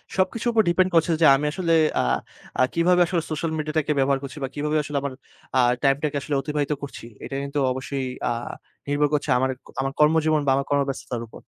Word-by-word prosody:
সবকিছুর 220 Hz, +6 st, 0 dB
উপর 220 Hz, -1 st, +4 dB
ডিপেন্ড 185 Hz, +2 st, +3 dB
করছে 165 Hz, +1 st, +4 dB
যে, -, -, +6 dB
আমি 145 Hz, +2 st, -1 dB
আসলে 170 Hz, -1 st, 0 dB, 0.3 s
আ -, -, 0 dB, 0.6 s
আ -, -, +6 dB
কিভাবে 180 Hz, +1 st, +3 dB
আসলে 170 Hz, -1 st, -1 dB
সোশ্যাল 160 Hz, +1 st, -2 dB
মিডিয়াটাকে 155 Hz, 0 st, -1 dB
ব্যবহার 135 Hz, 0 st, +2 dB
করছি 140 Hz, +2 st, -7 dB
বা -, -, 0 dB
কিভাবে 150 Hz, +1 st, 0 dB
আসলে 145 Hz, 0 st, -3 dB
আমার 140 Hz, -2 st, -4 dB, 0.4 s
আ -, -, +5 dB, 0.2 s
টাইমটাকে 145 Hz, +2 st, +1 dB
আসলে 145 Hz, 0 st, -2 dB
অতিবাহিত 150 Hz, +1 st, -2 dB
করছি। 140 Hz, -4 st, -7 dB, 0.2 s
এটা 135 Hz, -, -6 dB
কিন্তু 140 Hz, +1 st, -3 dB
অবশ্যই 130 Hz, 0 st, -3 dB, 0.2 s
আ -, -, 0 dB, 0.6 s
নির্ভর 145 Hz, +1 st, +2 dB
করছে 150 Hz, -, 0 dB, 0.5 s
আমার 135 Hz, 0 st, -1 dB
কর্মজীবন 155 Hz, 0 st, +4 dB
বা -, -, +2 dB
আমার 140 Hz, -, -1 dB
কর্মব্যস্ততার 135 Hz, -4 st, -1 dB
উপর। -, -, -13 dB
150 Hz, 185 wpm, -24 LUFS, 140-160 Hz, 0.6 s, যে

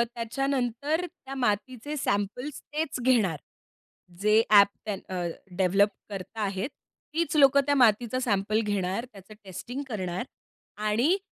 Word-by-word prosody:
त्याच्यानंतर 270 Hz, +6 st, -1 dB
त्या 270 Hz, -5 st, -10 dB
मातीचे 255 Hz, +3 st, -1 dB
सॅम्पल्स 245 Hz, +5 st, -2 dB
तेच 305 Hz, -4 st, -2 dB
घेणार. 225 Hz, -11 st, +3 dB, 0.8 s
जे 210 Hz, +2 st, +5 dB
ॲप 200 Hz, -1 st, +8 dB, 0.2 s
त्या 210 Hz, -2 st, -1 dB, 0.2 s
अ, 175 Hz, -, -1 dB, 0.3 s
डेव्हलप 195 Hz, +2 st, +4 dB, 0.2 s
करता 205 Hz, +2 st, -6 dB
आहेत, 195 Hz, +3 st, -1 dB, 0.4 s
तीच 330 Hz, 0 st, 0 dB
लोकं 280 Hz, 0 st, +7 dB
त्या 285 Hz, 0 st, +2 dB
मातीचा 240 Hz, -1 st, +3 dB
सॅम्पल 215 Hz, -2 st, +1 dB
घेणार, 205 Hz, +2 st, -1 dB
त्याचं 195 Hz, +1 st, -13 dB
टेस्टिंग 240 Hz, +8 st, -6 dB
करणार 185 Hz, -4 st, -3 dB, 0.6 s
आणि 255 Hz, -, +3 dB
225 Hz, 120 wpm, -27 LUFS, 200-270 Hz, 0.8 s, ॲप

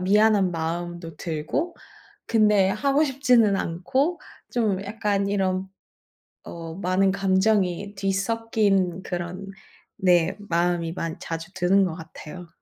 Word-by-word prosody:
미안한 205 Hz, 0 st, +4 dB
마음도 170 Hz, 0 st, -4 dB
들고 165 Hz, -, -3 dB, 0.5 s
근데 210 Hz, -4 st, +4 dB
하고 275 Hz, +8 st, +2 dB
싶지는 250 Hz, -7 st, +3 dB
않고 265 Hz, -, -1 dB, 0.3 s
좀 210 Hz, -5 st, 0 dB
약간 205 Hz, -1 st, -1 dB
이런 190 Hz, -1 st, 0 dB, 0.8 s
어, 165 Hz, -1 st, -7 dB
많은 190 Hz, +1 st, +1 dB
감정이 195 Hz, 0 st, +1 dB
뒤섞인 195 Hz, -2 st, 0 dB
그런 180 Hz, +2 st, -5 dB, 0.5 s
네, 180 Hz, -3 st, +3 dB
마음이 170 Hz, -3 st, 0 dB
많이 165 Hz, -1 st, -4 dB
자주 165 Hz, +1 st, -6 dB
드는 190 Hz, +2 st, +3 dB
것 175 Hz, -4 st, -2 dB
같아요. 165 Hz, +1 st, -10 dB
190 Hz, 225 characters per minute, -24 LUFS, 175-210 Hz, 0.8 s, 미안한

